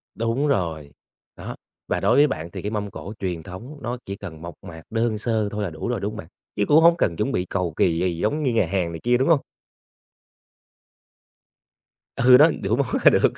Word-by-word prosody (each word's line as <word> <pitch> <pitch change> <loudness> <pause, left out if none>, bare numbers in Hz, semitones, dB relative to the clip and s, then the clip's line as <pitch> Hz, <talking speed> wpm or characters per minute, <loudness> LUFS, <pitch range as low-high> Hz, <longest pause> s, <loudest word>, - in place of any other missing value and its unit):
Đúng 115 +6 0
rồi, 80 - -1 0.4
đó, - - -7 0.3
và - - 0
đối 120 - +3
với 145 +2 +6
bạn 85 - -5
thì - - -6
cái 105 - -4
mâm 105 -2 -3
cổ 100 - -8
truyền 90 -4 -3
thống 110 - -9
nó 120 +1 -3
chỉ 100 - -5
cần 85 -6 -9
mộc 85 0 -8
mạc 80 -1 -10
đơn 115 -1 0
sơ 110 -1 -1
thôi 105 0 -3
là 100 - -2
đủ 80 -2 -6
rồi, - - -1
đúng - - -3
hông - - -8
bạn? - - -8 0.3
Chứ 100 - +1
cũng 155 +2 +6
hông 170 +1 +6
cần 85 - +1
chuẩn 105 +10 -1
bị 90 - -1
cầu 90 -4 -2
kì 85 -2 +2
gì 90 -2 0
giống 130 - -1
như 130 -4 +1
nhà 110 - +3
hàng 90 -1 -1
này 80 - -6
kia, 120 +1 +3
đúng 130 +5 +1
hông? 165 -4 +5 2.8
Ừ, 125 +1 +7
đó, 155 +4 +7
đủ 100 +3 +1
món 135 -1 0 0.2
là - - +9
được, - - +3
105 Hz, 225 wpm, -23 LUFS, 85-125 Hz, 2.8 s, là